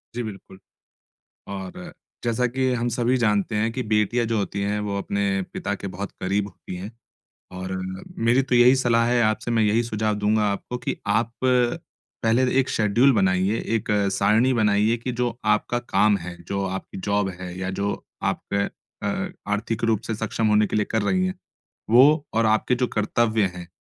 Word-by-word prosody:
जी, 120 - -2
बिल्कुल। 95 -2 -9 0.9
और 175 - -7 0.3
जैसा 120 +1 +1
कि 130 +1 0
हम 120 0 0
सभी 120 +2 +1
जानते 105 -2 +1
हैं 110 +2 +1
कि 125 +1 -3
बेटियाँ 110 +2 +1
जो 115 -1 0
होती 100 0 -2
हैं, 105 +1 -1
वो 100 -1 -2
अपने 100 0 -1
पिता 105 - -2
के 100 - -6
बहुत 100 +1 -5
करीब 100 +2 0
होती 95 - -10
हैं 95 +4 -7 0.6
और 95 +1 -5 0.5
मेरी 125 +3 +5
तो 130 -1 -1
यही 125 +2 +6
सलाह 115 -2 +2
है 120 0 +3
आपसे, 110 +2 0
मैं 115 -2 +2
यही 110 +3 +3
सुझाव 110 -2 -1
दूँगा 105 +1 +1
आपको 125 +5 -5
कि 120 - -3
आप 110 +3 +1 0.9
पहले 115 +3 +3 0.2
एक 130 - -2
शेड्यूल 115 +6 +3
बनाइए, 95 0 +2
एक 115 -1 -2 0.2
सारणी 110 +7 +3
बनाइए 105 0 +3
कि 120 +2 -4
जो 120 -1 0
आपका 105 +3 +1
काम 110 -3 +2
है, 85 0 -8
जो 100 0 -1
आपकी 95 0 -5
जॉब 100 -1 +1
है, 90 -1 -6
या 95 0 -2
जो 100 0 0 0.4
आपका 100 0 -2 0.3
अ, - - -1 0.2
आर्थिक 110 +2 -2
रूप 110 -3 +2
से 115 - -2
सक्षम 110 +1 -1
होने 105 0 +4
के - - -2
लिए 105 - +2
कर 110 -1 +1
रही 185 - +1
हैं, 185 - -2 0.6
वो 140 +6 +6
और 115 0 +2
आपके 110 +3 +2
जो 125 0 0
कर्तव्य 110 0 +1
हैं, 90 -1 -8
110 Hz, 180 wpm, -24 LUFS, 100-120 Hz, 0.9 s, यही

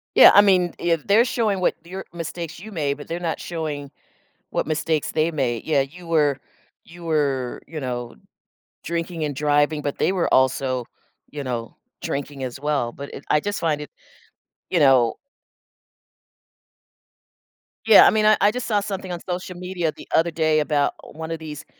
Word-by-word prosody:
Yeah, - - +10
I 205 - +9
mean, 185 -3 +3
if 165 -2 0
they're 215 +4 +6
showing 215 -6 0
what - - +2
your 190 +2 -7
mistakes 165 -1 -6
you 220 +3 -10
made, 145 -6 -1
but 145 - -10
they're 170 +1 -4
not 165 -2 -3
showing 150 -4 -5 0.6
what - - -1
mistakes 155 -1 -1
they 160 +1 +1
made 130 -7 -2
yeah, 150 -3 +2
you 170 +6 -11
were 150 -4 +2 0.5
you 175 +1 -13
were, 140 -6 -1
you 160 -2 -6
know, 120 -2 -4 0.7
drinking 170 -1 -3
and 145 - -2
driving, 145 +1 +2
but 145 -1 -3
they - - +2
were 185 -3 0
also, 130 -1 +2 0.5
you 145 -1 -6
know, 120 -3 -4 0.3
drinking 140 -1 -4
as 125 0 -5
well, 145 -5 -1
but 140 0 -9
it - - -9
I 150 - +4
just 205 +3 -3
find 155 -3 0
it 150 - -8 0.8
you 175 - +2
know 130 -5 +5 2.7
Yeah, - - +9
I - - +6
mean, 215 -1 +2
I 215 -1 +6
I 205 +1 +5
just 250 +1 -4
saw 210 -3 +2
something 195 -2 -5
on 175 - -4
social 180 0 -4
media 180 -3 -2
the - - -14
other 165 +1 +3
day 155 -1 +2
about 145 -1 +1 0.2
1 160 0 -5
of 165 - -3
these 150 -2 -8
155 Hz, 175 wpm, -23 LUFS, 145-175 Hz, 2.7 s, Yeah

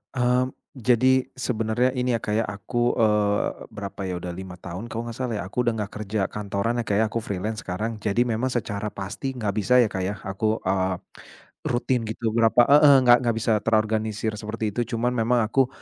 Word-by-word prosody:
Mmm. 125 +1 +2 0.2
Jadi, 130 +1 +3
sebenarnya 120 0 0
ini 125 -1 +1
ya - - -1
Kak 105 - -2
ya, 110 +2 +2
Aku, 120 +5 -1
eee, 105 -2 +1
berapa 100 -1 -5
ya? 90 - -3
Udah 90 - -4
lima 95 0 -8
tahun 90 +5 -7
kalau 115 0 -4
nggak 115 -1 -7
salah 125 -4 -2
ya. 100 - -3
Aku 120 +6 -2
udah 115 - +2
nggak 105 -2 -4
kerja 105 +1 -3
kantoran 105 +3 -2
ya - - 0
Kak 100 - +1
ya. 110 - +3
Aku 115 - -1
freelance 105 +1 -4
sekarang. 110 +4 -4
Jadi, 105 +3 +1
memang 120 +1 -1
secara 110 -4 -2
pasti 105 +7 -5
nggak 105 -5 -1
bisa 110 +5 +1
ya 110 - -1
Kak 95 - -3
ya, 100 +3 -2
aku 110 +3 -1
eee, 95 -1 +1 0.7
rutin 120 0 0
gitu. 110 0 -2
Berapa 115 +1 +5
heeh, 145 0 +7
nggak 120 -1 +7
nggak 115 -2 +1
bisa 110 -1 +2
terorganisir 110 -1 0
seperti 110 0 -3
itu, 120 - +1
cuman 120 +2 +1
memang 115 0 +2
aku, 130 +3 +3
110 Hz, 200 wpm, -24 LUFS, 105-120 Hz, 0.7 s, heeh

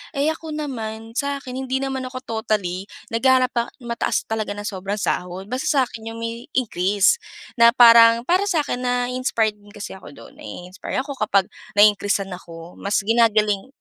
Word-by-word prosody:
Eh 285 +3 +2
ako 315 -1 -7
naman, 225 -6 -5
sa 280 -1 -1
akin 255 0 -6
hindi 265 +1 -1
naman 265 -1 -3
ako 255 0 -8 0.2
totally 195 -3 -2 0.2
naghahanap 255 +2 +3
pa 235 0 -1 0.2
mataas 235 -1 -1
talaga 215 -2 -3
na 205 - -6
sobrang 195 -1 -4
sahod. 190 0 -3
Basta 255 +1 -2
sa 275 -3 +3
'kin 225 -2 -8
'yong - - -8
may 230 +2 -5
increase. 205 - +2 0.4
Na 235 +1 +7
parang 230 -1 +8
para 365 +9 +2
sa 335 -6 +1
akin 250 - -3
nai-inspired 245 -3 0
din 205 0 -18
kasi 210 -1 -7
ako 190 - -12
do'n. 115 - -14
Nai-inspire 180 - -5
ako 280 0 -6
kapag 200 -2 +2 0.3
na-increase'an 205 -1 +4
ako. 170 -1 -10
Mas 200 +1 0
ginagaling 215 -2 +2
230 Hz, 170 wpm, -22 LUFS, 205-255 Hz, 0.4 s, parang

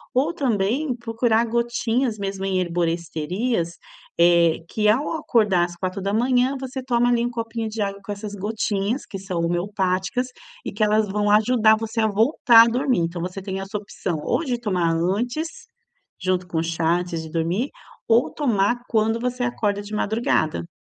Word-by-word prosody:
Ou 290 +7 +2
também 250 - 0
procurar 230 -1 +1
gotinhas 235 0 0
mesmo 195 -1 -4
em 190 -1 0
herboristerias, 170 +3 -1 0.5
eh, 170 -1 +5
que 210 +3 0
ao 255 +8 +2
acordar 210 - +2
às 175 0 -9
4:00, 220 +8 0
você 265 0 -5
toma 245 -1 +1
ali 235 -1 +2
um 240 - 0
copinho 230 -1 -4
de 215 -1 -2
água 200 0 -4
com 205 - -6
essas 205 0 -6
gotinhas 205 +3 -2
que 195 - -7
são 185 -2 -4
homeopáticas 190 +6 -1 0.4
e - - -3
que 215 - -1
elas 215 0 +3
vão 205 +1 0
ajudar 220 +1 +4
você 225 +1 -4
a 220 - +3
voltar 230 +2 +6
a - - +3
dormir. 250 -3 +1
Então 170 +1 -2
você 180 +2 -5
tem 190 -1 -4
essa 195 +2 -4
opção, 195 -4 -4
ou - - 0
de 245 -5 -2
tomar 180 -7 0
antes, 235 - -1 0.7
junto 185 -1 -1
com 170 - -4
o - - 0
chá, 165 +1 +1
antes 175 -2 -4
de 160 - -8
dormir, 170 - -1 0.4
ou 230 +2 +3
tomar 240 -4 +1
quando 225 +1 +1
você 250 +1 -2
acorda 210 -4 -1
de 210 - -9
madrugada. 210 - 0
210 Hz, 170 wpm, -23 LUFS, 185-240 Hz, 0.7 s, voltar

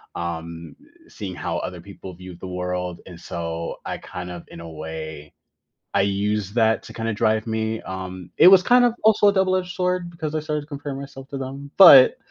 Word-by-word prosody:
um, 85 -1 -6 0.3
seeing 95 -4 -7
how - - -3
other - - -5
people 95 - -11
viewed 90 0 -11
the - - -7
world, 90 -1 -4
and 90 -2 -11
so 85 -1 -5
I - - -4
kind 90 0 -8
of, 85 -1 -8
in - - -11
a 85 0 -9
way, 80 -1 -8 0.6
I - - +3
used 100 0 -1
that 110 -1 +3
to - - -11
kinda 115 0 -3
drive 110 +1 +1
me, 110 0 -2
um, 95 -1 -7
it - - +8
was 190 -1 +8
kind 245 +3 +5
of, 240 -2 +2
also 215 -1 +5
a - - +4
double-edged 185 -2 0
sword, 180 -1 -1
because 160 -3 -5
I 155 - 0
started 150 -1 -3
to - - -14
compare 145 -1 -6
myself 135 0 -9
to 140 - -6
them. 135 +2 -7
But, 145 -9 +9
110 Hz, 200 wpm, -23 LUFS, 90-150 Hz, 0.6 s, But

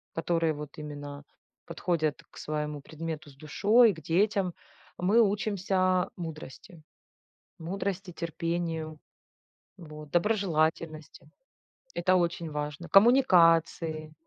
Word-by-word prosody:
которые 165 -1 0
вот 150 -1 -9
именно 145 -1 -8 0.4
подходят 155 -4 -1
к - - -16
своему 150 -1 -4
предмету 160 0 -7
с - - -20
душой, 210 - +4
к 160 - -12
детям, 185 +1 +1 0.5
мы 200 +6 +3
учимся 195 -3 +1
мудрости. 160 0 -9 0.8
Мудрости, 190 +2 -4
терпению, 165 -2 -3 0.8
вот, 150 -3 -11
доброжелательности- 165 -6 -1 0.7
это 185 -1 +3
очень 170 -1 -2
важно. 150 +2 -5
Коммуникации, 165 - +4
165 Hz, 95 wpm, -28 LUFS, 155-185 Hz, 0.8 s, душой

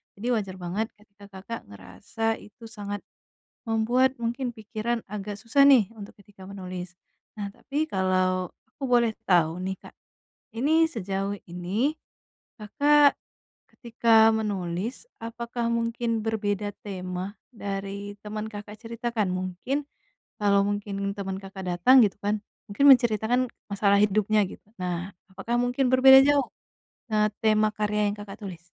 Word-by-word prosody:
Jadi 215 +5 -6
wajar 195 -4 -3
banget, 190 +6 -2
ketika 205 -1 -18
Kakak 230 +4 -7
ngerasa 100 - -4
itu 210 +3 -16
sangat 205 -2 -6 0.6
membuat 245 +4 +2
mungkin 240 +2 -2
pikiran 220 +2 -3
agak 205 0 -5
susah, 245 +5 +3
nih, 245 -8 +6
untuk 205 -2 -10
ketika 200 -1 -16
menulis. 185 -2 -7 0.4
Nah, 205 - -2
tapi, 290 +8 -3
kalau 185 - 0 0.2
aku - - -13
boleh 240 -2 +3 0.2
tahu, 170 -2 +3
nih, 190 0 -2
Kak. - - -13 0.6
Ini, 315 +7 +2
sejauh 200 - -3
ini, 185 - -1 0.7
Kakak 290 +6 +4 0.6
ketika 230 -2 +4
menulis, 205 - -3 0.2
apakah 235 +1 -4
mungkin 230 -1 -1
berbeda 205 -2 -1
tema, 185 0 -5 0.2
dari 200 0 -5
teman 215 +1 -5
Kakak 210 0 -8
ceritakan? 230 -2 -3
Mungkin, 185 +11 -3 0.5
kalau 200 -1 +4
mungkin 200 -1 -2
teman 190 -1 -3
Kakak 190 -1 -8
datang, 180 +10 +6
gitu 195 - -5
kan, 210 +1 0 0.3
mungkin 275 +8 +2
menceritakan 240 -2 +5 0.3
masalah 200 0 +3
hidupnya, 210 +1 +3
gitu. - - -12 0.2
Nah, 180 +1 -3 0.2
apakah 195 +6 -3
mungkin 245 +1 +1
berbeda 265 +1 +9
jauh, 285 -2 +3 0.6
eee, 210 -1 +2
tema 215 -1 +3
karya 210 0 0
yang 210 - -7
Kakak 205 0 -9
tulis? 175 -3 -9
210 Hz, 130 wpm, -26 LUFS, 195-235 Hz, 0.7 s, berbeda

